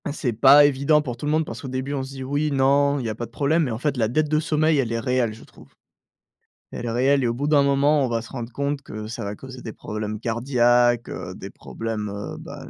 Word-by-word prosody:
C'est 135 -4 -2
pas 140 +6 +7
évident 145 +2 +3
pour 125 -4 -4
tout 135 +5 -6
le - - +1
monde, 155 +1 +1
parce 115 -3 -7
qu'au - - -7
début, 130 +2 -3
on 140 - -2
se 130 - -6
dit: 135 -1 -7
«Oui, 145 +3 -1
non, 140 +1 +3
il 125 - -4
y - - -1
a - - -2
pas 120 +1 -5
de - - -27
problème», 150 +6 +1
mais 130 - -2
en 110 - -3
fait, 140 +2 -1
la 110 -3 +2
dette 150 +6 0
de 155 0 +2
sommeil, 155 -1 +1
elle 120 -4 0
est 115 - -1
réelle, 125 -1 0
je 110 - -14
trouve. - - -17 1.0
Elle - - -6
est 115 - -2
réelle 135 +3 +2
et - - +2
au 115 - 0
bout 140 +5 -3
d'un 150 -2 +4
moment, 140 +1 +3
on - - -3
va 115 -1 -1
se 115 - -12
rendre 120 -2 -6
compte 140 +2 -2
que 110 -5 -8
ça 115 - -6
va 100 +1 -4
causer 130 +2 -10
des 110 - -6
problèmes 105 0 -5
cardiaques, 120 0 +2
heu, - - -6
des - - -9
problèmes, 110 -2 -5
heu, 100 0 -6
ben, - - -10
130 Hz, 275 wpm, -23 LUFS, 115-145 Hz, 1.0 s, pas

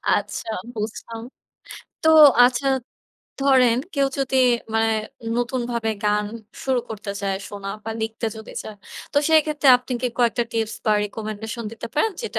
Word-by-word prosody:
আচ্ছা - - -4 0.3
বুঝলাম, 225 +1 -5 0.8
তো 320 - +3 0.4
আচ্ছা 250 +2 +1 0.7
ধরেন 260 -4 +4 0.2
কেউ 280 -1 +3
যদি 265 -1 0 0.4
মানে, 225 0 +3 0.5
নতুনভাবে 240 -2 -1
গান 210 0 +2 0.4
শুরু 260 -2 +1
করতে 215 -2 -6
চায় 195 -1 -1
শোনা 200 -1 -7 0.2
বা 225 - -4
লিখতে 225 +1 -3
যদি 220 0 -10
চায়। 215 - -9 0.4
তো 290 - +4
সেক্ষেত্রে 305 -2 +3
আপনি 250 +1 -8
কি - - +2
কয়েকটা 240 0 +2
টিপস 225 -1 -1
বা 215 - +4
রিকমেন্ডেশন 220 +2 -6
দিতে 230 0 -7
পারেন 440 +9 +2
যেটা 460 - -3
230 Hz, 140 wpm, -23 LUFS, 220-260 Hz, 0.8 s, ধরেন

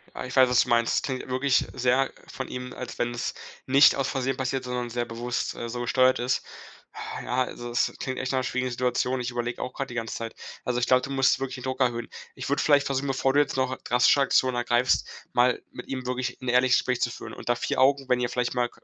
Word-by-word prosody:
Ja, - - -5
ich 125 - -7
weiß, 130 -1 +7
was 125 0 +3
du - - -2
meinst. 115 0 +2
Klingt 130 -2 -4
wirklich 130 +1 +2
sehr 130 +1 +2 0.2
von 130 - -6
ihm, 125 0 -6
als 125 - -7
wenn's 120 0 -2 0.3
nicht 140 +2 +6
aus 135 -1 0
Versehen 135 0 -1
passiert, 130 0 -2
sondern 125 -1 -3
sehr 120 0 -1
bewusst, 120 +1 -3
äh, 120 - -5
so 120 +1 -4
gesteuert 130 +2 +3
ist. 125 +1 0 0.5
Ha, - - -6
ja, 130 +1 +1
also, 120 -1 -7
das 120 - +1
klingt 130 -1 -4
echt 130 - -2
nach 130 -1 0
schwierigen 130 0 -1
Situation. 125 +1 0
Ich 125 - -3
überlege 120 0 -3
auch 125 - -4
gerade 135 - -4
die 120 - -9
ganze 115 -1 -3
Zeit. 115 -1 -6 0.3
Also, 125 -1 0
ich 125 - +1
glaube, 130 0 +4
du 140 - -6
musst 135 -1 +3
wirklich 135 -1 -4
den 125 - -9
Druck 130 0 -3
erhöhen. 120 -2 0 0.3
Ich - - -6
würde 140 - +1
vielleicht 145 -2 +4
versuchen, 135 0 -1
bevor 135 0 +1
du 145 - +4
jetzt 145 -2 +1
noch 130 0 0
drastische 125 +3 +4
Aktionen 130 -1 +3
ergreifst, 120 +1 +2 0.3
mal 125 0 +3
mit 125 - -9
ihm 130 -2 -4
wirklich 125 0 -2
'n 125 - -5
ehrliches 125 0 +4
Gespräch 125 -1 -1
zu 120 - +2
führen. - - -8
Unter 120 - -1
vier 125 - -1
Augen, 135 0 +3
wenn 125 -1 +2
ihr 120 -1 0
vielleicht 125 0 -1
mal 125 -1 0
125 Hz, 240 wpm, -26 LUFS, 120-130 Hz, 0.5 s, weiß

